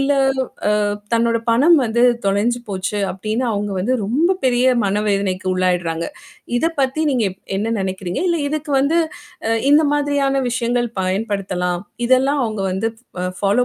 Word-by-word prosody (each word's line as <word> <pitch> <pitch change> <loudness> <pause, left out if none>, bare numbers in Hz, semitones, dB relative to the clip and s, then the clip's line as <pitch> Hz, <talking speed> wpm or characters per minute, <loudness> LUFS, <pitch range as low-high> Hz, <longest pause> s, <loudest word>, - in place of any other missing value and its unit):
இல்ல 275 +1 +2 0.7
அ - - +1 0.3
தன்னோட 230 0 +2
பணம் 290 +9 +5
வந்து 235 +1 +1 0.2
தொலைஞ்சு 220 +5 +1
போச்சு 195 +1 -2
அப்படின்னு 215 +6 -2
அவங்க 205 0 -2
வந்து 240 +7 0
ரொம்ப 315 - +2
பெரிய 250 0 +3 0.2
மனவேதனைக்கு 200 -2 0
உள்ளாயடுறாங்க. 175 -3 0 0.5
இத 320 - +1
பத்தி 265 +3 0
நீங்க 245 -5 +1
எப் 185 - -15 0.2
என்ன 220 +3 -1
நினைக்கறீங்க. 190 -1 -3
இல்ல 340 - +2
இதுக்கு 305 +1 -4
வந்து 295 +5 +2 0.5
அ - - +1 0.2
இந்த 295 +2 +6
மாதிரியான 285 -2 +1
விஷயங்கள் 240 0 0
பயன்படுத்தலாம். 185 -2 -1 0.2
இதெல்லாம் 265 +2 +3
அவங்க 215 -3 -3
வந்து 195 +4 0 0.3
அ - - -1
ஃபாலோ 205 +5 +2
225 Hz, 145 wpm, -19 LUFS, 195-265 Hz, 0.7 s, இந்த